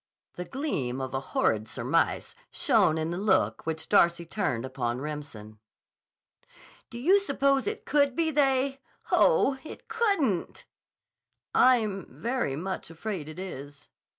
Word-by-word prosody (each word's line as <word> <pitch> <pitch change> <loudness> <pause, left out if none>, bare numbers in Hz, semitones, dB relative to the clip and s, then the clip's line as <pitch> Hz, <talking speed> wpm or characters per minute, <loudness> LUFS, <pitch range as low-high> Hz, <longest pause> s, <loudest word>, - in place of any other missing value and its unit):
The 180 - -6
gleam 145 - -3
of 130 0 -4
a 135 - 0
horrid 110 -5 0
surmise 130 +9 0 0.2
shone 220 - +2
in 160 +1 -2
the 175 - -3
look 195 -5 +1
which 160 0 -3
Darcy 170 0 +3
turned 145 - -2
upon 120 -2 -3
Remsen. 135 -8 -7 1.3
"Do 235 - -8
you 360 +12 +4
suppose 275 -6 +1
it 425 0 -4
could 285 -3 +2
be 325 0 +1
they? 270 -2 +1 0.3
Oh, 280 - +4
it 315 - -10
couldn't!" 400 - 0 0.9
"I'm 220 -6 +3
very 235 - -2
much 185 +4 -4
afraid 165 -2 -5
it 155 - -10
is." 145 -6 -8
190 Hz, 130 wpm, -28 LUFS, -, 1.3 s, you